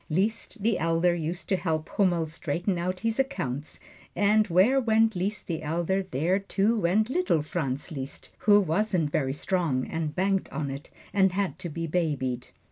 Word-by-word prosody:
Liszt 205 Hz, +5 st, -1 dB
the 225 Hz, 0 st, +2 dB
Elder 165 Hz, +2 st, +2 dB
used 170 Hz, +1 st, -3 dB
to 190 Hz, -, +3 dB
help 160 Hz, -3 st, -1 dB
Hummel 175 Hz, -5 st, +2 dB
straighten 170 Hz, +4 st, -2 dB
out 180 Hz, +1 st, -2 dB
his 225 Hz, +3 st, -1 dB
accounts, 150 Hz, -, -2 dB, 0.4 s
and 210 Hz, +1 st, +3 dB
where 205 Hz, +10 st, +4 dB
went 225 Hz, -2 st, +3 dB
Liszt 195 Hz, +4 st, -2 dB
the 165 Hz, -3 st, -3 dB
Elder, 170 Hz, +5 st, 0 dB
there, 180 Hz, +2 st, 0 dB
too, 200 Hz, +3 st, +1 dB
went 210 Hz, +6 st, +2 dB
little 350 Hz, -, +1 dB
Franz 150 Hz, -1 st, -3 dB
Liszt, 135 Hz, -2 st, -7 dB
who 205 Hz, -1 st, +6 dB
wasn't 180 Hz, -3 st, +1 dB
very 135 Hz, -3 st, 0 dB
strong 150 Hz, -5 st, 0 dB
and 160 Hz, -2 st, -3 dB
banked 195 Hz, +1 st, 0 dB
on 140 Hz, -1 st, -3 dB
it, 140 Hz, +2 st, -8 dB, 0.2 s
and 190 Hz, -2 st, +3 dB
had 185 Hz, -5 st, -1 dB
to 180 Hz, -2 st, -5 dB
be 165 Hz, +2 st, -4 dB
babied. 145 Hz, -7 st, -1 dB
175 Hz, 170 wpm, -27 LUFS, 155-200 Hz, 0.4 s, who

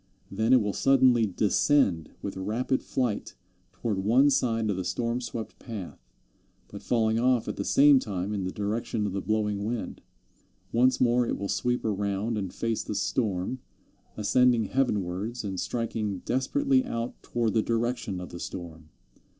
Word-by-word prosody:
Then 110 Hz, +4 st, 0 dB
it 130 Hz, -4 st, +6 dB
will 105 Hz, -1 st, -1 dB
suddenly 130 Hz, -2 st, +4 dB
descend 100 Hz, -, +2 dB
with 100 Hz, -, -4 dB
rapid 110 Hz, +7 st, -1 dB
flight 120 Hz, -6 st, -2 dB, 0.4 s
toward 100 Hz, +1 st, -3 dB
one 125 Hz, +9 st, +4 dB
side 115 Hz, -5 st, +1 dB
of -, -, -1 dB
the 95 Hz, -, -3 dB
storm 115 Hz, +6 st, -1 dB
swept 115 Hz, -2 st, -6 dB
path, 105 Hz, -7 st, -7 dB, 0.7 s
but 100 Hz, -, -9 dB
falling 110 Hz, -2 st, +1 dB
off 125 Hz, -1 st, +2 dB
at -, -, -3 dB
the -, -, -3 dB
same 140 Hz, -1 st, +6 dB
time 100 Hz, -3 st, -3 dB
in 100 Hz, -2 st, -2 dB
the 95 Hz, -, -2 dB
direction 105 Hz, +2 st, -2 dB
of 100 Hz, -, -2 dB
the 100 Hz, -, -2 dB
blowing 105 Hz, -1 st, -1 dB
wind. 115 Hz, +1 st, -4 dB, 0.7 s
Once 125 Hz, +2 st, +3 dB
more 120 Hz, -1 st, +3 dB
it -, -, -1 dB
will 100 Hz, -, -3 dB
sweep 125 Hz, +5 st, 0 dB
around 105 Hz, +1 st, -1 dB
and 95 Hz, -3 st, -3 dB
face 115 Hz, -1 st, -2 dB
the 105 Hz, -, -5 dB
storm, 105 Hz, +2 st, -1 dB, 0.6 s
ascending 120 Hz, +2 st, +3 dB
heavenwards 105 Hz, -3 st, -1 dB
and 95 Hz, -3 st, -4 dB
striking 110 Hz, -4 st, -3 dB
desperately 260 Hz, -, +2 dB
out 115 Hz, -, -4 dB
toward 115 Hz, -3 st, -1 dB
the 110 Hz, -, +3 dB
direction 115 Hz, -4 st, -1 dB
of 90 Hz, -, -7 dB
the 85 Hz, -, -8 dB
storm. 80 Hz, -4 st, -8 dB
110 Hz, 160 wpm, -27 LUFS, 100-125 Hz, 0.7 s, it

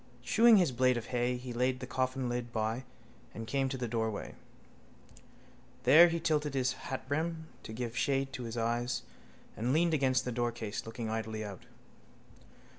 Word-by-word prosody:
Chewing 230 Hz, 0 st, +6 dB
his 175 Hz, -7 st, +3 dB
blade 125 Hz, 0 st, +3 dB
of 115 Hz, -, -4 dB
hay 125 Hz, +1 st, +1 dB
he 125 Hz, 0 st, -7 dB
laid 125 Hz, +2 st, +1 dB
the 125 Hz, -, -5 dB
coffinlid 125 Hz, -2 st, -2 dB
by 115 Hz, +3 st, -2 dB, 0.5 s
and 115 Hz, -, -5 dB
came 135 Hz, +3 st, 0 dB
to 130 Hz, -, -3 dB
the 125 Hz, -1 st, -2 dB
doorway. 110 Hz, -2 st, -2 dB, 1.5 s
There 155 Hz, +8 st, +9 dB
he 170 Hz, 0 st, -1 dB
tilted 150 Hz, -3 st, 0 dB
his 130 Hz, -2 st, +1 dB
hatbrim 160 Hz, +5 st, -3 dB
to -, -, -9 dB
give 120 Hz, +1 st, -4 dB
shade 135 Hz, 0 st, 0 dB
to 125 Hz, -3 st, -5 dB
his 115 Hz, +1 st, -5 dB
eyes 120 Hz, +2 st, -1 dB, 0.5 s
and 120 Hz, +3 st, -1 dB
leaned 165 Hz, +1 st, +3 dB
against 130 Hz, -4 st, +2 dB
the 125 Hz, -, -2 dB
doorcase, 120 Hz, -3 st, -3 dB
looking 115 Hz, 0 st, -5 dB
idly 110 Hz, -1 st, -3 dB
out. 100 Hz, -3 st, -9 dB
125 Hz, 160 wpm, -32 LUFS, 115-135 Hz, 1.5 s, There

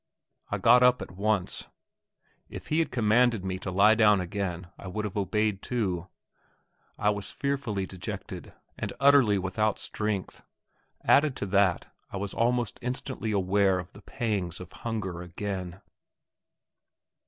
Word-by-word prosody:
I 100 Hz, -, -1 dB
got 115 Hz, +5 st, +6 dB
up 125 Hz, 0 st, +4 dB
at -, -, -11 dB
once; 100 Hz, 0 st, -1 dB, 0.8 s
if -, -, -9 dB
he 155 Hz, -, +2 dB
had 165 Hz, -, +1 dB
commanded 115 Hz, -2 st, +2 dB
me 95 Hz, -1 st, -3 dB
to 95 Hz, -, -5 dB
lie 100 Hz, +4 st, +5 dB
down 105 Hz, -3 st, +5 dB
again 90 Hz, -1 st, -3 dB
I -, -, -10 dB
would 105 Hz, +3 st, -3 dB
have 100 Hz, -, -5 dB
obeyed 105 Hz, 0 st, 0 dB
too. 95 Hz, -8 st, -2 dB, 0.9 s
I 105 Hz, -, +2 dB
was 100 Hz, -1 st, -4 dB
fearfully 135 Hz, -9 st, -2 dB
dejected, 95 Hz, -1 st, -7 dB, 0.3 s
and -, -, -3 dB
utterly 135 Hz, -7 st, +5 dB
without 100 Hz, +3 st, 0 dB
strength; 105 Hz, -3 st, -4 dB, 0.6 s
added 145 Hz, -2 st, +4 dB
to -, -, -3 dB
that, 100 Hz, -3 st, +1 dB, 0.2 s
I -, -, -5 dB
was 100 Hz, 0 st, -3 dB
almost 120 Hz, -1 st, 0 dB
instantly 125 Hz, -2 st, -3 dB
aware 95 Hz, -1 st, +2 dB
of 90 Hz, -1 st, -7 dB
the 100 Hz, -, -13 dB
pangs 100 Hz, -7 st, -3 dB
of 90 Hz, -1 st, -10 dB
hunger 105 Hz, -7 st, -4 dB
again. 90 Hz, +1 st, -5 dB
100 Hz, 140 wpm, -28 LUFS, 95-115 Hz, 0.9 s, got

